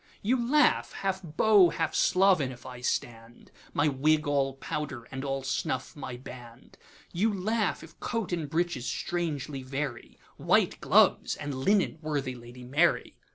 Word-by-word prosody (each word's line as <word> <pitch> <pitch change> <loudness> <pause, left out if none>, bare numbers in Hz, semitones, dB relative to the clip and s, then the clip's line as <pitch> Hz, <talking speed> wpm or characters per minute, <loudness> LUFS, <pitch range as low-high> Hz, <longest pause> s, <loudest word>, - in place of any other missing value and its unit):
You 235 +6 +2
laugh, 295 +5 +3
half 190 -1 -2
Beau, 185 +3 +4
half 160 -2 -2
Sloven 180 -8 +3
if 120 -2 -12
I 125 -1 -9
stand, 115 -1 -4 0.2
My 145 - +2
wig 150 +2 +2
all 140 -2 0
powder, 135 -4 -5
and 130 0 -5
all 135 -1 -2
snuff 130 -1 -2
my 130 -4 -6
band; 125 -1 -12 0.4
You 205 +6 +2
laugh 210 +1 -1
if 165 0 -15
coat 230 -6 -3
and 160 -4 -2
breeches 165 -5 -1
strangely 150 -4 -3
vary, 135 -1 -5 0.2
White - - +2
gloves, - - +4
and 145 -1 -5
linen 170 +5 +1
worthy 145 -4 -2
Lady 120 +1 -12
Mary! 145 +8 +1
145 Hz, 150 wpm, -28 LUFS, 130-175 Hz, 0.4 s, Beau